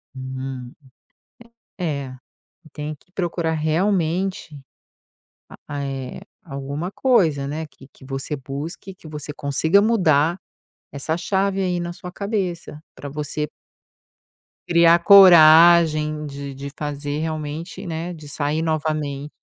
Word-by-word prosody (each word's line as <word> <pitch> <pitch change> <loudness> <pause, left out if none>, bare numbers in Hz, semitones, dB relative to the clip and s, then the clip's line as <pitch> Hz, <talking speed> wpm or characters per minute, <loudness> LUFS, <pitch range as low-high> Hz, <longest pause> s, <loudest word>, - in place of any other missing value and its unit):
Hum. 130 -1 -6 1.1
É 150 -6 -2
é, 130 0 -10 0.6
tem 150 +1 -5
que 165 +5 -26
procurar 170 -3 -2
realmente 165 0 -1 0.9
a - - -11
a 145 -1 -4
eh, 135 -2 -5 0.2
alguma 140 +3 -5
coisa, 165 - +2
né, 155 +3 -4
que 135 -2 -18
que - - -18
você 135 +2 -4
busque, 145 +8 -7
que 180 - -16
você 150 -1 -7
consiga 150 +6 +2
mudar 175 -6 +2 0.5
essa 145 +3 -2
chave 195 +2 0
aí 180 -2 0
na 175 0 -4
sua 180 +1 -9
cabeça, 185 -7 -3
pra 145 - -8
você 150 +1 -3 1.2
criar 170 0 +5
coragem 165 -4 +7
de 140 -1 -7
de 140 +1 -7
fazer 145 0 -4
realmente 155 +2 -5
né, 170 +1 -4
de 155 -3 -11
sair 150 +2 -1
novamente. 155 -3 -2
155 Hz, 120 wpm, -22 LUFS, 145-175 Hz, 1.2 s, coragem